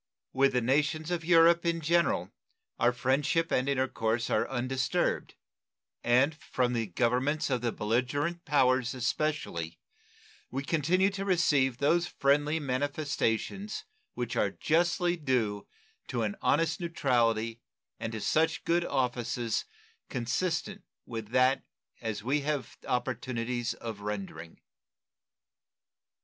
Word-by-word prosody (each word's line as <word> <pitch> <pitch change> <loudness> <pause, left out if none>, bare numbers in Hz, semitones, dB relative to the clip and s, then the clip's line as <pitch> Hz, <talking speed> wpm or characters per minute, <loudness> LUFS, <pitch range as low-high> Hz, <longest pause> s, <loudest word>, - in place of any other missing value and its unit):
With 135 0 +3
the 125 - +2
nations 150 +6 +1
of 170 -2 -1
Europe 170 0 +5
in 170 -1 0
general 160 - +1 0.5
our 120 - +4
friendship 140 +6 +1
and 130 +2 +1
intercourse 120 -4 0
are - - +1
undisturbed, 130 0 -1 0.7
and 130 +6 +4
from 125 -5 -1
the 115 -2 -1
Governments 125 - 0
of 125 -2 +1
the 120 -1 0
belligerent 130 +11 -1
powers 130 -3 +2
especially 125 - -2 0.7
we 135 +2 -3
continue 170 +6 +2
to 195 0 -4
receive 145 -9 +2
those 170 +6 +2
friendly 145 +2 +2
manifestations 145 - -2 0.3
which - - -3
are - - +2
justly 175 +2 +1
due 120 -9 -1 0.4
to 120 -2 -1
an 105 -2 -1
honest 165 - +2
neutrality 120 -9 +1 0.4
and 115 0 -4
to 110 - -4
such 160 +8 +1
good 170 +1 +2
offices 120 -5 -1 0.4
consistent 175 - -2 0.2
with 115 -3 -6
that 130 +3 +3 0.4
as 105 -2 -3
we 135 +5 +1
have 145 -3 -3
opportunities 120 -1 -2
of 115 -3 -6
rendering. 95 -6 -6
130 Hz, 115 wpm, -30 LUFS, 120-160 Hz, 0.7 s, Europe